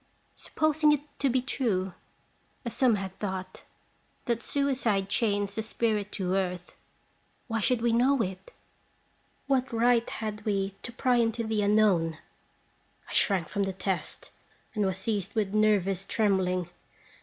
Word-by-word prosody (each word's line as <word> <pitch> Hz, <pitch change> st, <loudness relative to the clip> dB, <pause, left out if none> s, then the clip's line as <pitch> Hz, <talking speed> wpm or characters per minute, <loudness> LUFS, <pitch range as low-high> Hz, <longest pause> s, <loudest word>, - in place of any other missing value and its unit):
Supposing 310 Hz, -1 st, +2 dB
it 290 Hz, -, 0 dB, 0.2 s
to 275 Hz, -, +2 dB
be 255 Hz, 0 st, +1 dB
true, 195 Hz, -9 st, -1 dB, 0.7 s
as 235 Hz, -, -3 dB
some 250 Hz, -4 st, +4 dB
have 195 Hz, -2 st, -4 dB
thought, 190 Hz, -2 st, -5 dB, 0.6 s
that 235 Hz, -2 st, 0 dB
suicide 245 Hz, -10 st, 0 dB
chains 205 Hz, -2 st, 0 dB
the 220 Hz, -, -2 dB
spirit 215 Hz, -2 st, -1 dB
to 185 Hz, -3 st, -2 dB
earth, 180 Hz, -2 st, -2 dB, 0.7 s
why 225 Hz, -2 st, -1 dB
should 230 Hz, +2 st, +1 dB
we 235 Hz, -1 st, +3 dB
know 260 Hz, +4 st, +3 dB
it? 190 Hz, -, -7 dB, 0.9 s
What 265 Hz, -2 st, +1 dB
right 235 Hz, 0 st, +3 dB
had 215 Hz, -1 st, -5 dB
we 195 Hz, -2 st, -1 dB
to -, -, -5 dB
pry 245 Hz, +1 st, +1 dB
into 230 Hz, 0 st, +1 dB
the 220 Hz, -1 st, 0 dB
unknown? 200 Hz, -6 st, +3 dB, 0.9 s
I -, -, -9 dB
shrank 185 Hz, -6 st, +3 dB
from 205 Hz, -, -2 dB
the 195 Hz, -1 st, -1 dB
test, 185 Hz, -4 st, -4 dB, 0.4 s
and 210 Hz, -3 st, +1 dB
was 190 Hz, -1 st, -2 dB
seized 205 Hz, 0 st, -2 dB
with 205 Hz, -3 st, 0 dB
nervous 200 Hz, -3 st, +2 dB
trembling. 190 Hz, -4 st, +1 dB
210 Hz, 145 wpm, -28 LUFS, 190-235 Hz, 0.9 s, some